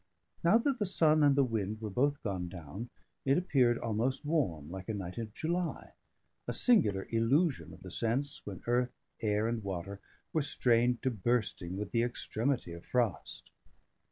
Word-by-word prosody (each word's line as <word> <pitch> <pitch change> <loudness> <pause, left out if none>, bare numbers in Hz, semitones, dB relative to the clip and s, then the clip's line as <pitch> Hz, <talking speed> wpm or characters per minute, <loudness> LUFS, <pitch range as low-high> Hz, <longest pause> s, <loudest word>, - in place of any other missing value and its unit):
Now 170 +7 +6
that 260 +2 0
the 205 - +1
sun 155 -4 +4
and 145 -2 +5
the 140 - +5
wind 110 -3 -2
were 110 -2 -5
both 140 +6 +1
gone 95 -4 -2
down, 90 +7 -7 0.3
it 135 +1 +3
appeared 130 -9 +3
almost 120 +6 -1
warm, 110 - 0
like 95 +1 -7
a 110 - -1
night 95 +1 -5
of 110 -2 -5
July: 170 +8 -2 0.6
a - - -1
singular 105 - +3
illusion 135 +8 +2
of - - -13
the 95 - -8
sense, 125 +8 0
when 95 -3 -8
earth, 125 +1 +1 0.3
air, 105 0 +1
and 115 -1 -1
water 95 +1 -4 0.3
were 160 - +2
strained 120 -3 +2
to 130 - +2
bursting 105 -5 -1
with 105 -1 -4
the 115 - +2
extremity 120 -3 -1
of 85 +1 -9
frost. 120 -5 -2
115 Hz, 170 wpm, -32 LUFS, 100-140 Hz, 0.6 s, Now